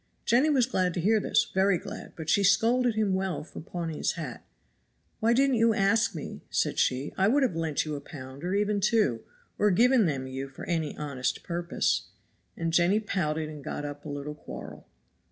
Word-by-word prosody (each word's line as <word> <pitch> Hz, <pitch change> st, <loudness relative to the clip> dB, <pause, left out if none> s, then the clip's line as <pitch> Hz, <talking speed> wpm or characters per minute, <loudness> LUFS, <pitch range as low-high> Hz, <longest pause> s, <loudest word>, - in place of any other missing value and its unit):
Jenny 250 Hz, +7 st, +4 dB
was 265 Hz, -5 st, +4 dB
glad 185 Hz, -8 st, 0 dB
to -, -, -1 dB
hear 215 Hz, +5 st, +3 dB
this, -, -, +1 dB
very 190 Hz, 0 st, +3 dB
glad, -, -, -8 dB
but 160 Hz, -2 st, -7 dB
she 200 Hz, +5 st, +3 dB
scolded 230 Hz, +5 st, +3 dB
him 215 Hz, -3 st, +1 dB
well 190 Hz, -5 st, -1 dB
for -, -, -10 dB
pawning 165 Hz, -2 st, -5 dB
his -, -, 0 dB
hat. 150 Hz, -9 st, -6 dB, 0.8 s
"Why 225 Hz, +1 st, +3 dB
didn't 265 Hz, +1 st, +3 dB
you 225 Hz, -1 st, +4 dB
ask 205 Hz, +1 st, +2 dB
me?" 155 Hz, -, -6 dB
said -, -, 0 dB
she; 130 Hz, +3 st, 0 dB
"I 190 Hz, -, +4 dB
would 275 Hz, +6 st, +3 dB
have 240 Hz, -10 st, +1 dB
lent 160 Hz, -3 st, -1 dB
you 155 Hz, -, -4 dB
a 140 Hz, -, -6 dB
pound 135 Hz, 0 st, -10 dB
or 180 Hz, +2 st, -1 dB
even 205 Hz, 0 st, +1 dB
two, 205 Hz, -, +2 dB, 0.4 s
or 210 Hz, -, +4 dB
given 235 Hz, +2 st, +4 dB
them 135 Hz, -4 st, -2 dB
you 130 Hz, +1 st, -5 dB
for 135 Hz, -, -9 dB
any 160 Hz, -4 st, -2 dB
honest 140 Hz, -4 st, -3 dB
purpose." 170 Hz, 0 st, -1 dB, 0.5 s
And 165 Hz, -1 st, -2 dB
Jenny 175 Hz, +5 st, +4 dB
pouted 160 Hz, -7 st, -1 dB
and 150 Hz, -2 st, -9 dB
got 145 Hz, -, -4 dB
up 145 Hz, 0 st, -7 dB
a 155 Hz, -, -7 dB
little 145 Hz, +1 st, -5 dB
quarrel. 150 Hz, -, -10 dB
175 Hz, 200 wpm, -28 LUFS, 150-215 Hz, 0.8 s, Jenny